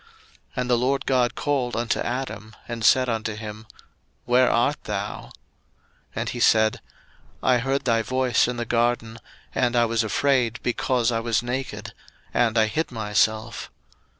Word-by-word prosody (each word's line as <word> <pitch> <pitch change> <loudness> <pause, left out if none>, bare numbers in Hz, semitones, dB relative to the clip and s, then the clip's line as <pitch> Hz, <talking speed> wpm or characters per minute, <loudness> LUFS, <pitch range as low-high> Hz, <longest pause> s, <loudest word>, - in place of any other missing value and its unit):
01:003:009 460 - -26 0.5
And 125 -1 -2
the 120 - +4
LORD 135 +2 0
God 125 -2 +2
called 135 -4 -1
unto 115 -1 0
Adam, 120 -4 -4
and 115 -2 -5
said 130 +4 +5
unto 110 -2 -2
him, 105 0 -8 0.6
Where 125 +1 +4
art 120 +5 +1
thou? 105 0 -4
01:003:010 - - -17 0.8
And - - -2
he 120 - -5
said, 110 -2 +3 0.6
I 125 -1 +4
heard 135 +2 -1
thy 115 -2 +3
voice 130 +2 +1
in 125 0 -3
the 120 - -2
garden, 115 -1 0 0.3
and 125 -1 +1
I 120 -1 +4
was 115 0 +1
afraid, 120 +1 +1
because 125 -1 +1
I 115 - 0
was 115 0 0
naked; 125 +2 -4 0.4
and 115 -2 +2
I 110 - +5
hid 155 +9 -2
myself. 110 +1 0
120 Hz, 160 wpm, -24 LUFS, 110-125 Hz, 0.8 s, said